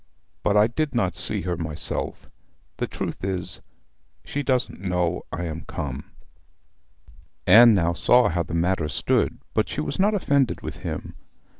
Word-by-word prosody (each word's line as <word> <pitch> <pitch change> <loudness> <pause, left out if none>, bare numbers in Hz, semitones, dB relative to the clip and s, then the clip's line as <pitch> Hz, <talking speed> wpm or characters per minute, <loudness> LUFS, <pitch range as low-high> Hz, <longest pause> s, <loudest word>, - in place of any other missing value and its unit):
But 105 - +2
I 105 - +6
did 145 +4 -2
not 95 -6 +1
see - - +2
her 90 -1 -2
myself. 80 -2 -3 0.5
The - - -2
truth - - -5
is, 90 -2 -3 0.6
she 145 - -3
doesn't 130 -8 -1
know 90 -2 0
I 90 - -4
am 80 0 -5
come.' 65 -3 -5 1.4
Anne 115 +3 +8
now 85 -2 +2
saw 125 +7 +4
how 85 0 0
the 85 0 -4
matter 85 -2 0
stood; 70 - 0 0.2
but - - +1
she - - -4
was 75 - -3
not 205 +2 +3
offended 140 - +1
with - - -6
him. - - -6
90 Hz, 155 wpm, -24 LUFS, 85-120 Hz, 1.4 s, Anne